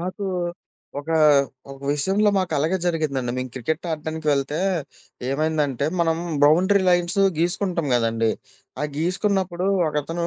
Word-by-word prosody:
మాకు 185 +3 -4 0.7
ఒక, 145 +2 -8 0.6
ఒక 135 - -12
విషయంలో 195 +8 +2
మాకలాగే 165 -2 +1
జరిగిందండి 150 -8 -1
మేము 130 0 -3
క్రికెట్ 155 +7 -3
ఆడడానికి 160 0 -4
వెళ్తే 140 +1 0 0.7
ఏమైందంటే 145 -2 0
మనం 165 -1 +2 0.3
బౌండరీ 185 +7 +4
లైన్సు 175 +2 +2 0.2
గీసుకుంటాం 175 -1 0
కదండీ. 115 -1 +1 0.5
ఆ - - -1
గీసుకున్నప్పుడు 185 +1 0 0.2
ఒకతను 165 +3 -2
160 Hz, 110 wpm, -23 LUFS, 145-180 Hz, 0.7 s, బౌండరీ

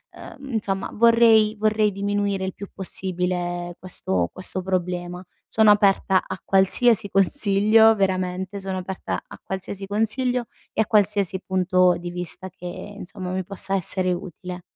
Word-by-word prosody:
Uhm, 275 -3 -10
insomma, 195 -3 -2
vorrei 230 -1 +5
vorrei 215 0 +2
diminuire 200 -1 -1
il 190 - -4
più 200 - -9
possibile 180 -2 -3
questo 95 - -2
questo 185 0 -2
problema. 180 -1 -3 0.2
Sono 215 -1 +5
aperta 195 -2 +3
a - - -5
qualsiasi 200 +2 +3
consiglio, 215 +1 +4
veramente, 190 0 -1
sono 190 -1 -4
aperta 185 +1 -4
a - - -13
qualsiasi 190 +1 -5
consiglio 240 +4 0 0.3
e 220 - +1
a - - +2
qualsiasi 200 -3 +1
punto 185 -1 +2
di 175 0 -6
vista 180 +1 -6
che, 180 0 -14
insomma, 185 -1 -7
mi 185 0 -2
possa 195 +1 -3
essere 185 0 0
utile. 180 +1 -7
190 Hz, 140 wpm, -23 LUFS, 180-210 Hz, 0.3 s, vorrei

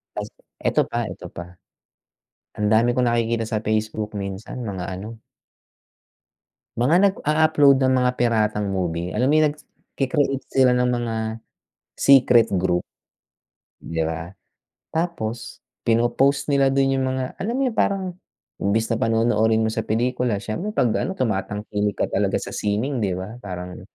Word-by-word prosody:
Tas, - - -4 0.4
eto - - +2
pa, - - -1
eto - - -10
pa. 85 +1 -8 1.0
Ang 105 0 0
dami 115 +3 +4
kong 125 -1 +2
nakikita 115 -1 0
sa 110 -1 -2
Facebook 110 0 -1
minsan, 100 +4 -5
mga 95 -6 -4
ano 105 +5 -7 1.6
mga 130 +8 +3
nag-a-upload 155 -6 +4
ng 130 - +3
mga 125 0 +3
piratang 110 -3 +1
movie, 90 -1 -2
alam 125 +5 +1
mo - - +3
yung 155 -1 +3
nagke-create 135 -2 -3
sila 130 -2 +4
ng 125 0 +2
mga 120 -2 -1 0.8
secret 125 -4 +6
group 90 -1 0 0.9
'di 80 0 -3
ba? 80 +3 -4 0.6
Tapos 160 -9 -3 0.2
pinopost 120 +5 +2
nila 135 -1 +3
dun 135 0 +3
yung 130 - 0
mga 130 0 -3
alam 215 +5 -2
mo 265 - -1
yung 225 - -10
parang 195 -1 +1 0.5
imbes 110 +3 0
na 115 - +1
panonoorin 115 -1 +2
mo 110 - +1
sa 110 0 -3
pelikula, 120 -2 0
siyempre 170 - -4
pag 130 - +2
ano 190 - -2
tumatangik 105 - -2
ka - - 0
talaga - - +1
sa - - -6
sining 110 +7 -1
'di 100 -5 0
ba? 95 +6 -6
Parang 90 -5 -7
115 Hz, 145 wpm, -23 LUFS, 105-130 Hz, 1.6 s, secret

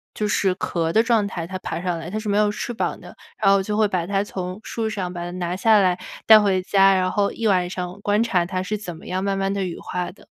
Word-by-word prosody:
就 210 - -1
是 195 -2 +1
壳 165 -3 -1
的 220 - +4
状 230 -4 +2
态， 175 -4 -5
它 185 +1 -5
爬 165 - -4
上 175 -2 -2
来 165 +1 -7
它 210 - -4
是 215 -1 -4
没 200 - +2
有 210 0 +3
翅 225 +3 -4
膀 225 - -2
的， - - -12 0.2
然 195 -2 +4
后 195 0 +4
就 210 +2 -2
会 215 -1 +4
把 180 -4 -2
它 200 0 +1
从 185 -1 -5
树 225 -1 -3
上 190 -4 -3
把 175 - -5
它 175 - -5
拿 175 0 -2
下 215 +3 +4
来 185 -2 +2 0.3
带 220 -1 +10
回 195 -3 +2
家， 195 0 +5
然 185 0 +1
后 205 -1 +1
一 230 - -5
晚 180 -3 +2
上 180 +1 -5
观 205 +2 +2
察 185 -7 +1
它 185 0 -2
是 210 +3 -2
怎 180 -5 -7
么 - - -14
样 185 +1 -2
慢 195 0 0
慢 195 0 0
地 200 -1 -1
羽 175 - -5
化 180 -1 -4
的。 190 - -20
195 Hz, 300 characters per minute, -22 LUFS, 180-210 Hz, 0.3 s, 带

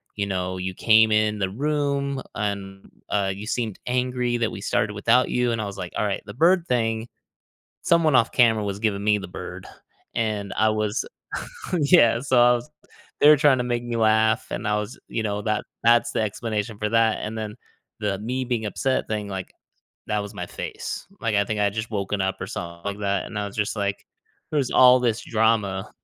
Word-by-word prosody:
you 100 - -1
know, 95 -1 -2
you 95 0 -3
came 110 +2 +5
in 105 0 +2
the 95 -1 0
room 140 +2 -1
and, 100 -2 -4 0.2
uh, 100 -2 +1
you 105 +2 -8
seemed 115 -4 -2
angry 125 -1 0
that 115 -2 0
we - - -7
started 105 +1 0
without 115 +5 +3
you," 125 -1 +1
and 115 -1 -1
I - - -3
was, 100 -1 -7
like, 90 -2 -6
"Alright, 105 -2 -1
the 100 - -8
bird 170 - +3
thing, 115 -2 0 0.8
someone 165 -3 +3
off 115 - +3
camera 110 -4 +4
was 100 -1 -3
giving 105 -3 0
me 105 0 +3
the 95 -2 -7
bird, - - -8 0.5
and 105 -3 -2
I 110 - +4
was" 110 +1 -1 0.8
Yeah, 140 -7 +5
so 130 -2 +2
I 120 0 +6
was 120 +4 -3 0.5
"They're 150 +1 +8
trying 145 -3 +4
to 125 - 0
make 120 -1 -1
me 120 - -3
laugh 110 +1 +3
and 105 - -3
I 105 - +2
was" 105 +3 -5
you 115 - -3
know, 105 -1 -2
that 110 0 0 0.2
that's 120 +1 +4
the - - 0
explanation 110 0 -3
for 105 - -1
that, 115 0 +3
and 110 +1 -5
then 105 -1 -5 0.4
the 100 -2 -1
me-being-upset 125 +1 -1
thing, 105 -2 -3
like, 95 -2 -6 0.5
that 105 0 0
was 100 0 -6
my 90 - -5
face, - - -6
like, 115 -3 0
I 100 0 +3
think 105 +1 -2
I - - +4
had 100 - 0
just 110 +1 -3
woken 100 -1 -2
up 95 0 -2
or 95 - -4
something 85 -2 -7
like 100 0 -3
that, 100 -1 -1
and 105 - -5
I 105 - -2
was 100 - -11
just, 105 +1 0
like, 100 -1 -2 0.5
"There's 140 -4 0
all 125 0 +7
this 120 -2 0
drama." 110 -4 +1
110 Hz, 205 wpm, -24 LUFS, 100-120 Hz, 0.8 s, They're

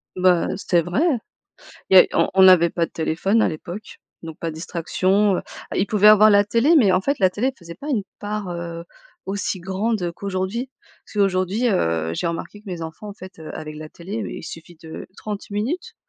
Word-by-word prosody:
Bah, 180 -2 +3
c'est 175 -3 +1
vrai. 175 - -1 0.9
Il 190 - +5
y - - +12
a - - +5
on - - +2
on 190 -1 +8
avait 170 -2 +6
pas 170 0 -1
de - - -7
téléphone 185 +7 0
à - - +3
l'époque, 175 +6 -8 0.2
donc 160 -1 -9
pas 165 - -3
de - - -9
distraction. 185 +4 +1
Heu, - - -3 0.3
il 190 - +1
pouvait 210 0 +5
avoir 215 0 +8
la 205 -1 +5
télé, 235 +10 +3
mais 210 -10 +5
en 180 - +3
fait 280 +7 -1
la 185 -2 +4
télé, 210 +7 -1
elle 270 - -4
faisait 170 -1 -10
pas 285 - -9
une 230 -8 0 0.2
part, 205 -2 -4
heu, 170 -1 -6 0.4
aussi 195 0 -3
grande 190 0 -2
qu'aujourd'hui. 195 +7 -3 0.4
Parce - - -16
qu'aujourd'hui, 195 +3 +1
heu, 80 - 0
j'ai - - -2
remarqué 170 +5 -5
que 210 - -27
mes 175 -2 -5
enfants 165 +6 -8
en 205 - -8
fait, 185 -3 -12
heu, 160 -1 -8
avec 155 -1 -7
la 155 0 -8
télé 180 +7 -8
il - - -7
suffit 165 +2 -10
de 160 -1 -8
30 210 -1 -6
minutes. 320 - -3
185 Hz, 215 wpm, -22 LUFS, 170-210 Hz, 0.9 s, y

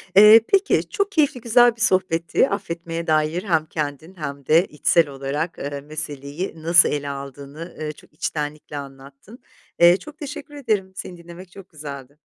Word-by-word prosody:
Eee, 210 +3 +9
peki, 395 +1 +2
çok 400 -2 -1
keyifli, 290 -8 +1
güzel 240 +1 +4
bir 230 - -12
sohbetti 185 -1 +2
affetmeye 170 -4 -4
dair. 155 +2 +1
Hem 165 -6 +1
kendin 155 +3 -5
hem 140 -4 -6
de 165 +6 +4
içsel 155 +2 +2
olarak, 140 +5 -4
eee, 140 0 -5
meseleyi 150 +2 -6
nasıl 170 +1 +6
ele 145 -1 -3
aldığını, 140 +4 -8
ııı, 155 -1 -3
çok - - -20
içtenlikle 150 -1 -4
anlattın. 140 - -11 0.4
Eee, 175 +2 +7
çok 300 +5 -13
teşekkür 295 0 -8
ederim, 215 -9 -1
seni 180 -1 -7
dinlemek 170 +2 -12
çok 195 0 -13
güzeldi. 145 -3 -9
165 Hz, 155 wpm, -22 LUFS, 145-195 Hz, 0.4 s, Eee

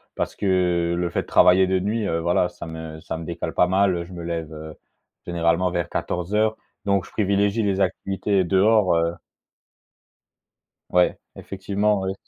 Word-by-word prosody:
parce - - -3
que 90 -3 +1
le 85 0 -1
fait - - -1
de - - -21
travailler 95 +1 +5
de 95 0 +1
nuit, 105 +3 -1
heu, 85 - 0
voilà 85 +1 +2
ça - - -10
me 80 -1 -7
ça 80 - -5
me 80 - -7
décale 85 -1 -4
pas 90 - +3
mal, 95 0 +2
heu, 85 - -3
je 90 - -12
me 85 -1 -7
lève, 85 -2 -4
heu, 80 0 -9 0.5
généralement 85 +1 +1
vers 85 -2 -2
14:00 105 +5 -1 0.3
donc 100 -2 +1
je - - -15
privilégie 100 +2 +1
les 100 -1 0
activités 95 0 0
dehors, 95 0 +3
heu 85 +1 0 1.7
Ouais 90 0 +3 0.2
effectivement 100 +1 -1
oui 95 0 -2
90 Hz, 170 wpm, -23 LUFS, 85-100 Hz, 1.7 s, travailler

